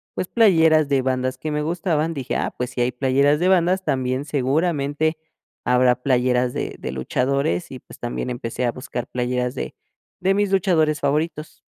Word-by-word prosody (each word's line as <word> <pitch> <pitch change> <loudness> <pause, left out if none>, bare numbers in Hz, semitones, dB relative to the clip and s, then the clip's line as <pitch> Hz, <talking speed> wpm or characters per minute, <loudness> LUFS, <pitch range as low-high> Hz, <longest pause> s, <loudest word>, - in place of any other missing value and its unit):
pues, 185 - -2
playeras 160 -9 +4
de 135 -2 +2
bandas 130 0 -1
que 155 +3 -4
me 150 0 -1
gustaban, 165 -1 -1
dije: 135 -3 -3
"Ah, - - -2
pues, 125 0 -2
si - - -6
hay 125 +1 +1
playeras 140 +3 +2
de 185 - +3
bandas 185 +1 +3
también 130 +1 -1
seguramente 150 +2 0 0.5
habrá 125 0 +4
playeras 125 -1 +2
de - - -4
de 65 - -4
luchadores". 140 - -1
Y 130 - -7
pues - - -15
también 120 +1 -3
empecé 125 0 -3
a 120 - +1
buscar 125 -1 -5
playeras 125 0 -1
de - - -5 0.5
de 190 +1 +3
mis 205 -1 +1
luchadores 160 -6 +2
favoritos. 150 +2 -2
140 Hz, 175 wpm, -22 LUFS, 125-160 Hz, 0.5 s, playeras